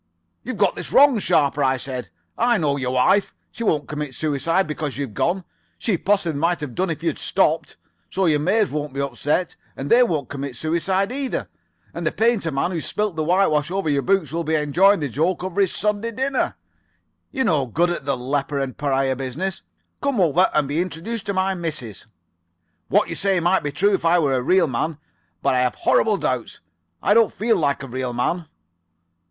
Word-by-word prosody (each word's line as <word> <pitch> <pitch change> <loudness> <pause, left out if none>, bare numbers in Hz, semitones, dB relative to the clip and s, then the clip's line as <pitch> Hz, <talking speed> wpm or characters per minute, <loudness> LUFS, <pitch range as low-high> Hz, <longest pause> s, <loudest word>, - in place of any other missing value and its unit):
"'You've - - -5
got - - +2
this - - -6
wrong, 275 -4 +6
Sharper,' 145 -6 +2
I 130 0 +2
said. 130 -2 -5 0.3
'I 240 0 +2
know 150 -6 +1
your 130 -2 -2
wife. 190 +11 +3 0.2
She 230 - -6
won't 150 - +1
commit 150 -2 -5
suicide 165 +5 0
because 150 -2 -4
you've 140 -6 -4
gone. 180 - 0 0.3
She 220 - 0
possibly 175 -5 0
might 170 +3 +1
have 145 -5 -5
done 185 +6 -1
it - - +1
if 160 - -12
you 170 - +2
had 155 - -6
stopped. - - 0 0.3
So 190 0 0
your 155 -3 +3
maids 200 +7 +2
won't 150 -2 -3
be - - -3
upset, 145 +6 -1 0.2
and 135 - -5
they 240 - +7
won't 165 -12 +1
commit 140 -2 -5
suicide 185 - 0
either. 270 0 -3 0.4
And 170 - -5
the - - +1
painter's 220 -7 +1
man 140 +6 -1
who 170 -3 -2
spilt 210 0 -2
the 160 - -1
whitewash 170 -3 +2
over 190 -4 -1
your 140 -1 +1
books 185 -4 +1
will 170 +1 -2
be 160 0 0
enjoying 165 +6 +3
the 145 - 0
joke 165 +8 -1
over 190 +1 -1
his 190 - +2
Sunday 210 +2 -1
dinner. 265 +3 -1 0.7
You're 265 -1 -1
no 150 - +1
good 170 +9 +1
at 175 - -4
the 140 -1 0
leper 140 +3 -2
and 135 -2 -2
pariah 135 -2 0
business. 140 +9 -4 0.4
Come 280 -5 0
over 175 +1 +4
and 150 -2 +2
be 150 +4 0
introduced 185 +5 -5
to 200 - -1
my 190 +1 +1
missus.' 155 - -6 0.8
"'What 205 +2 +3
you - - -4
say 195 -2 +1
might 175 +3 +2
be 145 - -3
true 200 +8 +2
if 190 - 0
I 170 +1 +4
were 145 -5 +2
a 130 - +1
real 180 +7 +3
man, 145 +3 -2 0.5
but - - +3
I 130 - +2
have 125 -1 +1
horrible 215 -2 +2
doubts. 130 -8 -3 0.4
I 205 - +4
don't 225 0 +4
feel 225 +1 +1
like 140 -4 0
a - - -6
real 130 0 -3
man. 160 +8 -1
165 Hz, 205 wpm, -22 LUFS, 140-195 Hz, 0.8 s, they